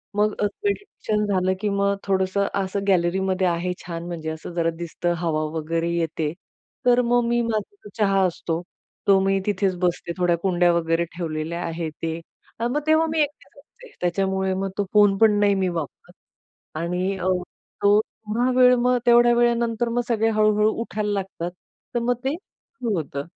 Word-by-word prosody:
मग 210 Hz, 0 st, +2 dB
अ, -, -, +3 dB, 0.2 s
मेडिटेशन 400 Hz, -, -1 dB
झालं 190 Hz, -2 st, +1 dB
की 210 Hz, -, 0 dB
मग 200 Hz, 0 st, +1 dB
थोडंसं 190 Hz, 0 st, +1 dB, 0.2 s
असं 190 Hz, +1 st, -2 dB
गॅलरीमध्ये 185 Hz, +1 st, +2 dB
आहे. 175 Hz, +1 st, 0 dB
छान 170 Hz, -1 st, -5 dB
म्हणजे 165 Hz, -2 st, -4 dB
असं 160 Hz, +2 st, -7 dB
जरा 165 Hz, -1 st, +1 dB
दिसतं, 175 Hz, +1 st, -2 dB
हवा 160 Hz, -2 st, -1 dB
वगैरे 165 Hz, +2 st, -1 dB
येते. 160 Hz, -2 st, -1 dB, 0.5 s
तर 245 Hz, 0 st, +5 dB
मग 245 Hz, 0 st, +4 dB
मी 240 Hz, 0 st, +2 dB
माझा 230 Hz, -, -4 dB
चहा 195 Hz, -2 st, +3 dB
असतो, 165 Hz, -1 st, -3 dB, 0.5 s
तो 195 Hz, -1 st, +6 dB
मी 195 Hz, 0 st, +2 dB
तिथेच 195 Hz, -2 st, 0 dB
बसते. 175 Hz, -1 st, -1 dB
थोड्या 175 Hz, -1 st, +2 dB
कुंड्या 175 Hz, 0 st, +2 dB
वगैरे 165 Hz, 0 st, +1 dB
ठेवलेल्या 165 Hz, 0 st, -3 dB
आहेत 165 Hz, -1 st, -3 dB
ते. 165 Hz, 0 st, -2 dB, 0.4 s
अ, 235 Hz, -, +1 dB
मग 265 Hz, +5 st, 0 dB
तेव्हा 315 Hz, +1 st, +4 dB
मी 320 Hz, -, 0 dB
एकटीच 295 Hz, -1 st, -4 dB
असते. 475 Hz, -, -17 dB
त्याच्यामुळे 190 Hz, +1 st, 0 dB
मग 195 Hz, +1 st, -2 dB
तो 205 Hz, -, +1 dB
फोन 205 Hz, -2 st, +5 dB
पण 210 Hz, -1 st, +4 dB
नाही 205 Hz, -1 st, +4 dB
मी 190 Hz, -1 st, +1 dB
वापरत. 150 Hz, -4 st, -7 dB, 0.7 s
आणि 180 Hz, +4 st, -1 dB
अ, 180 Hz, -, -3 dB, 0.6 s
तो 205 Hz, +1 st, +6 dB
थोडा 220 Hz, +3 st, -2 dB
वेळ 250 Hz, 0 st, +7 dB
मग 250 Hz, +1 st, +3 dB
तेवढ्या 240 Hz, 0 st, +6 dB
वेळानंतर 235 Hz, -1 st, +1 dB
मग 240 Hz, +1 st, 0 dB
सगळे 225 Hz, -2 st, +2 dB
हळू-हळू 215 Hz, 0 st, +3 dB
उठायला 210 Hz, -2 st, -2 dB
लागतात. 190 Hz, -3 st, -3 dB, 0.4 s
तर -, -, +2 dB
मग 245 Hz, +1 st, +1 dB
ते 270 Hz, +2 st, 0 dB
सुरू 255 Hz, -, -7 dB
होतं 140 Hz, -3 st, -4 dB
195 Hz, 170 wpm, -23 LUFS, 175-225 Hz, 0.7 s, वेळ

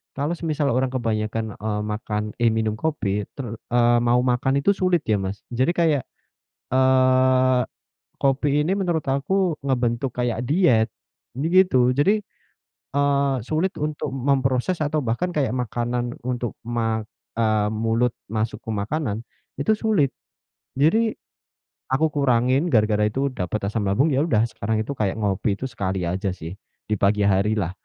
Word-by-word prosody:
kalau 145 Hz, +4 st, -1 dB
semisal 155 Hz, -3 st, -1 dB
orang 130 Hz, +2 st, +1 dB
kebanyakan, 110 Hz, -2 st, -2 dB
eee, 105 Hz, 0 st, -2 dB
makan 105 Hz, -1 st, -3 dB, 0.2 s
eh, 115 Hz, -1 st, +4 dB
minum 110 Hz, -1 st, -1 dB
kopi 105 Hz, -10 st, -1 dB
ter 135 Hz, -, -5 dB, 0.3 s
eee, 120 Hz, 0 st, +4 dB
mau 120 Hz, +1 st, +3 dB
makan 125 Hz, +1 st, +1 dB
itu 200 Hz, -, +4 dB
sulit 185 Hz, -4 st, +1 dB
ya 110 Hz, -2 st, +1 dB
Mas. 95 Hz, +1 st, -4 dB
Jadi 130 Hz, +7 st, +2 dB
kayak, 160 Hz, -5 st, +2 dB, 0.7 s
eee, 130 Hz, -1 st, +4 dB, 0.6 s
kopi 140 Hz, +2 st, +2 dB
ini 170 Hz, -, 0 dB
menurut 175 Hz, -5 st, 0 dB
aku 165 Hz, +5 st, +1 dB
ngebentuk 125 Hz, -1 st, 0 dB
kayak 120 Hz, -2 st, -1 dB
diet. 130 Hz, -10 st, +3 dB, 0.5 s
Jadi 145 Hz, +5 st, -1 dB
gitu. 135 Hz, -10 st, +5 dB
Jadi, 200 Hz, +8 st, +3 dB, 0.7 s
eee, 140 Hz, -1 st, +2 dB
sulit 160 Hz, +8 st, -1 dB
untuk 150 Hz, -2 st, -3 dB
memproses 135 Hz, +4 st, +1 dB
atau 155 Hz, 0 st, 0 dB
bahkan 170 Hz, +11 st, -1 dB
kayak 135 Hz, -6 st, +1 dB
makanan 120 Hz, 0 st, -2 dB
untuk 120 Hz, -1 st, -3 dB
ma 115 Hz, -1 st, -1 dB, 0.3 s
eee, 110 Hz, -2 st, +2 dB
mulut 115 Hz, +2 st, 0 dB, 0.2 s
masuk 110 Hz, 0 st, -2 dB
ke -, -, -9 dB
makanan, 110 Hz, +1 st, -2 dB, 0.3 s
itu 150 Hz, +10 st, +2 dB
sulit. 205 Hz, -, +1 dB, 0.6 s
Jadi 215 Hz, +11 st, +3 dB, 0.7 s
aku 150 Hz, +5 st, +1 dB
kurangin 130 Hz, 0 st, +2 dB
gara-gara 105 Hz, -8 st, +2 dB
itu 135 Hz, +6 st, -1 dB
dapat 100 Hz, -3 st, -3 dB
asam 105 Hz, -1 st, -2 dB
lambung. 100 Hz, +11 st, +2 dB
Ya 140 Hz, +2 st, +2 dB
udah, 110 Hz, -10 st, +2 dB
sekarang 110 Hz, 0 st, -2 dB
itu 110 Hz, -, -4 dB
kayak 100 Hz, -3 st, 0 dB
ngopi 100 Hz, 0 st, 0 dB
itu 130 Hz, +6 st, -5 dB
sekali 95 Hz, -4 st, -3 dB
aja 90 Hz, +2 st, -2 dB
sih, 85 Hz, +2 st, -8 dB, 0.3 s
di 105 Hz, -, +1 dB
pagi 100 Hz, +2 st, +2 dB
harilah. 100 Hz, -1 st, +1 dB
125 Hz, 145 wpm, -23 LUFS, 110-145 Hz, 0.7 s, gitu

